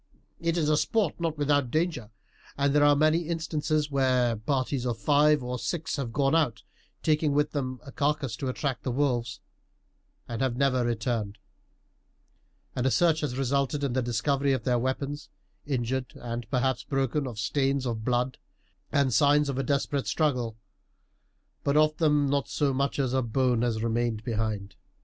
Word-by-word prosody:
It 165 0 0
is 155 -3 +1
a 155 0 +3
sport 205 -1 0
not 165 -2 -2
without 145 -3 +2
danger; 155 -7 -1 0.5
and 140 0 +2
there 145 0 +4
are 145 0 +6
many 155 +3 +2
instances 155 -2 -1
where 130 -3 +2
parties 130 +3 -1
of 120 -2 -2
five 150 +2 +3
or 125 0 -3
six 160 -3 -3
have 130 -5 -3
gone 135 +2 +1
out, 150 -9 +1 0.4
taking 155 -1 +2
with 150 +1 +1
them 130 -3 -3
a 140 - -9
carcass 145 -4 -1
to 135 - -3
attract 130 0 -2
the - - -3
wolves, 120 -3 -1 0.9
and 115 -1 -4
have 130 -2 0
never 130 -2 +2
returned; 115 -3 -2 1.4
and 125 0 0
a - - +4
search 160 +3 +3
has 140 -5 -3
resulted 140 +2 0
in 135 -3 0
the 130 - +1
discovery 135 +4 +1
of 130 - -2
their 125 -2 +1
weapons, 140 +4 -3 0.4
injured 130 -1 -2
and 120 -2 -6
perhaps 130 0 0
broken, 135 +1 -1
of 120 -4 -7
stains 135 +2 0
of 115 -3 -3
blood 125 +2 0 0.5
and 140 -3 +2
signs 145 +1 +4
of 135 -1 -2
a - - 0
desperate 140 +1 -1
struggle, 125 -8 0 1.1
but 140 +1 +2
of 155 0 +4
them 150 -4 +3
not 140 -1 0
so 145 -3 0
much 140 +1 -1
as 130 -3 0
a 130 - +2
bone 125 0 +1
has 115 -2 0
remained 115 -1 -1
behind." 105 -3 -3
135 Hz, 170 wpm, -27 LUFS, 120-145 Hz, 1.4 s, are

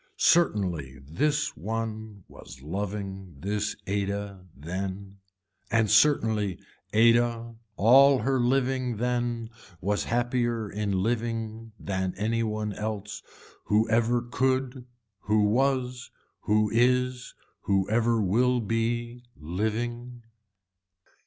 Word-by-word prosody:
Certainly 90 - +2
this 145 - 0
one 110 0 -5
was 65 - -13
loving 95 0 -5
this 105 +5 -2
Ada 100 -1 -3
then. 95 +5 -6 0.5
And 115 -3 +2
certainly 110 -6 +3 0.3
Ada 115 +1 +3 0.2
all 135 +6 +6
her 130 +3 0
living 130 -1 0
then 120 -1 -2 0.3
was 100 +2 -1
happier 120 -2 0
in 100 -3 -1
living 115 -1 -3
than 95 -1 -3
any 115 +3 0
one 105 -1 -2
else 105 0 -5 0.4
who 105 +2 +2
ever 120 +1 +2
could, 130 +1 -1 0.3
who 105 +1 +1
was, 125 +2 0 0.4
who 105 0 +2
is, 125 +1 +1 0.3
who 95 -1 +1
ever 115 +1 +2
will 125 +6 +2
be 120 +2 -2
living. 120 +8 -4
110 Hz, 100 wpm, -27 LUFS, 100-120 Hz, 0.5 s, all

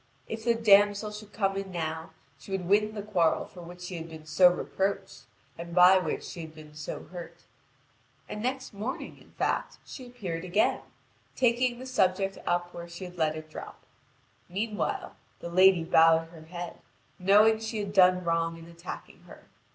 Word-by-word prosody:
If 225 0 -5
the 235 0 +3
damsel 205 -1 +4
should 210 0 -10
come 195 -2 0
in 195 -1 -4
now, 160 -2 -4 0.3
she - - -14
would 190 -2 -2
win 210 +2 +3
the 205 - -4
quarrel 175 -6 +1
for 180 - -13
which 175 +1 -11
she 180 0 -5
had 165 0 -7
been 160 -1 -10
so 180 +4 +6
reproached, 180 -6 -3 0.3
and 170 0 -7
by 180 +1 +8
which 160 -4 -3
she 170 - -7
had 160 -1 -9
been 155 -1 -13
so 150 0 -6
hurt. 170 -1 -10 0.8
And 210 - -6
next 260 +1 -3
morning, 215 +6 -5
in - - -20
fact, - - -1
she 255 -2 -9
appeared 185 -9 -5
again, 185 +4 +1 0.5
taking 245 0 +2
the 255 - -8
subject 195 -6 +1
up 175 0 0
where 170 0 -8
she 170 +2 -8
had 180 0 -11
let 155 -1 +2
it 155 0 -8
drop. - - -9 0.7
Meanwhile, 210 +4 -3 0.2
the 170 - -6
lady 185 -1 +6
bowed 165 0 +5
her 165 -2 -13
head, 175 0 -7 0.4
knowing 210 +4 +5
she 220 0 -4
had 200 -1 -3
done 185 -2 +5
wrong 165 0 0
in 165 - -12
attacking 170 +1 -9
her. - - -14
185 Hz, 180 wpm, -28 LUFS, 170-210 Hz, 0.8 s, by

